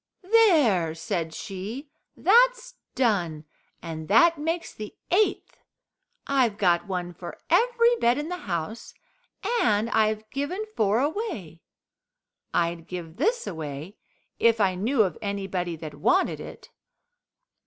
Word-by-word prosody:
"There," 275 - +4
said 165 0 -3
she, 210 - -7 0.3
"that's - - +4 0.2
done, 175 -11 0 0.4
and 160 -2 -6
that 335 - +5
makes 330 +3 -3
the 215 -1 -8 0.2
eighth. 410 +4 +1 0.7
I've 255 -7 +1
got 175 -2 +2
one 180 -2 -3
for - - -9
every 475 0 +4
bed 240 - +2
in 295 +1 -3
the 360 +1 -4
house, 170 +7 -4 0.7
and 215 +1 +2
I've 215 0 +1
given 290 +10 -3
four 215 +2 +2
away. 285 - -3 0.9
I'd 170 -1 -1
give 175 -2 -7
this 470 +2 +1
away 160 +3 -6 0.4
if 230 -1 +4
I 195 -3 +3
knew 220 +6 +2
of 185 -5 -3
anybody 195 -4 -3
that 155 -1 -8
wanted 360 - +1
it." - - -11
215 Hz, 120 wpm, -26 LUFS, -, 0.9 s, that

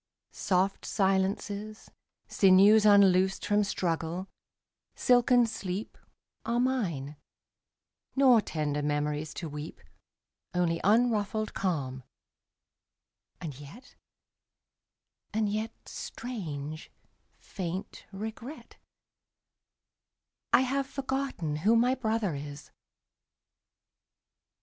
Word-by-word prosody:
Soft 190 +1 0
silences, 200 +2 -1 0.4
Sinews 200 +3 +6
unloosed 190 -2 +5
from 210 0 +3
struggle, 175 -1 -2 0.7
silken 245 0 +4
sleep, 205 -2 -5 0.5
27 - - -44
Are 240 - +2
mine; 180 - -1 1.0
nor 260 -4 +6
tender 150 -5 -2
memories 150 +1 -1
to 170 - -5
weep. 150 +1 -7 0.8
Only 170 -2 +1
unruffled 215 0 +2
calm; 140 -9 -2 1.4
and 150 -6 -7
yet 145 - -13 0.7
— - - -54
and 220 -1 +2
yet 215 +2 -2
— - - -43
Strange, 155 - -6 0.5
faint 185 0 -6
regret 220 +8 -8 0.9
— - - -62
I - - +6
have 270 +1 0
forgotten 265 - -3
who 210 +9 +3
my 245 +2 +4
brother 220 -7 -1
is! 145 0 -8
195 Hz, 90 wpm, -29 LUFS, 160-225 Hz, 1.4 s, Sinews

